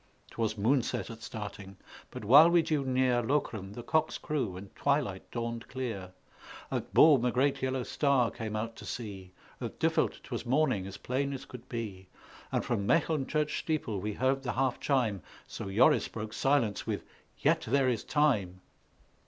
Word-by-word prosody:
'Twas 110 -2 -1
moonset 115 +3 0
at 115 0 -10
starting; 100 -3 -7 0.3
but - - -8
while 145 +9 +9
we 170 -1 +4
drew 155 -3 0
near 130 -2 +2
Lokeren, 110 -6 -1
the 120 - -7
cocks 155 +3 +1
crew 125 -12 -2
and 95 +1 -11
twilight 140 -10 0
dawned 115 -1 -4
clear; 115 -8 -5 0.6
At - - -3
Boom 145 -6 +6
a 125 - +2
great 135 +2 +1
yellow 130 -1 -1
star 135 -3 +2
came 110 -3 -5
out 115 +1 -3
to - - -10
see; 100 -6 -6 0.3
At - - -5
Duffeld - - +1
'twas - - -5
morning 120 -7 +1
as 100 - -8
plain 140 +2 -2
as 135 - -6
could 125 -2 -11
be; 105 -6 -5 0.4
And - - 0
from 100 0 -1
Mecheln 155 -4 +2
church 150 -1 0
steeple 150 -10 -2
we 105 +2 -3
heard 130 +4 +1
the 125 -3 -3
half 130 -1 0
chime 120 - +1 0.2
So 95 - -6
Joris 110 +6 +4
broke 110 -1 -6
silence 135 -8 +1
with - - -2 0.3
"Yet - - +2
there 140 -2 +3
is 120 -4 0
time!" 105 - +1
120 Hz, 170 wpm, -30 LUFS, 105-140 Hz, 0.6 s, while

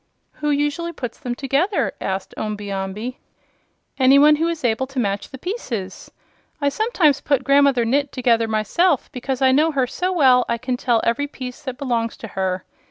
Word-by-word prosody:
"Who 295 - 0
usually 295 +4 -1
puts 245 -7 -6
them 245 -5 -4
together?" 280 - 0
asked 190 0 -3
Omby 210 -1 -4
Amby. 195 +6 -4 0.8
"Any 265 +1 +6
one 300 +1 +6
who 325 +2 +1
is 335 -3 -3
able 240 +3 +1
to 270 0 -12
match 200 -3 -2
the 265 - -9
pieces. 250 - -5 0.5
I 285 -1 +2
sometimes 310 - +2
put 280 -3 +1
Grandmother 275 -3 +4
Gnit 280 +4 +1
together 235 -4 +1
myself, 230 - +1
because 260 +1 -3
I 260 - +5
know 305 +5 +3
her 265 -2 +2
so 360 +9 -2
well 260 -8 +5
I 235 - +1
can 255 +2 -2
tell 240 -2 +1
every 260 +5 0
piece 255 -1 -8
that 260 -4 -6
belongs 235 -4 -2
to 225 - -8
her. 190 -2 -2
260 Hz, 180 wpm, -21 LUFS, 230-290 Hz, 0.8 s, Any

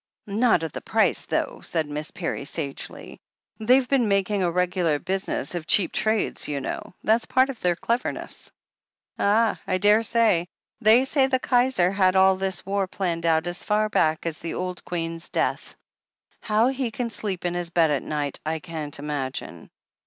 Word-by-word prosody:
"Not 215 -3 +2
at 160 - -4
the - - -5
price - - +1
though," - - -2
said 160 -3 -2
Miss 150 +1 -4
Parry 170 -5 -4
sagely. 140 -1 -5 0.4
"They've 250 +4 +4
been 260 -4 +2
making 200 0 +1
a 180 - +2
regular 180 -3 +1
business 190 +5 -3
of 170 -2 -5
cheap 190 -5 +3
trades, 220 0 -1
you 145 -2 -2
know. 140 - -6
That's 225 +2 +2
part 260 +1 +3
of 250 - -12
their 175 -1 +1
cleverness." 235 +8 -3 0.7
"Ah, 220 +2 +2
I 185 - +1
daresay. 210 -2 +3 0.3
They 230 +3 +5
say 265 -1 +3
the 265 -1 +2
Kaiser 245 -8 +2
had 190 -1 +2
all 190 0 +5
this 190 -1 -2
war 195 0 0
planned 170 -3 -2
out 160 0 +2
as 175 +1 -2
far 215 0 +1
back 160 -6 +1
as 165 -2 -2
the 170 - -5
old 180 -1 -4
Queen's 165 -1 -4
death. - - -2 0.6
How 220 +3 +2
he 265 -2 -2
can 235 +1 -4
sleep 195 -4 -3
in 175 - 0
his 175 -1 -3
bed 165 -2 +3
at 145 - 0
night, 145 -2 -3
I 160 +1 -1
can't 160 -3 -6
imagine!" 140 - -5
185 Hz, 175 wpm, -24 LUFS, 165-220 Hz, 0.7 s, They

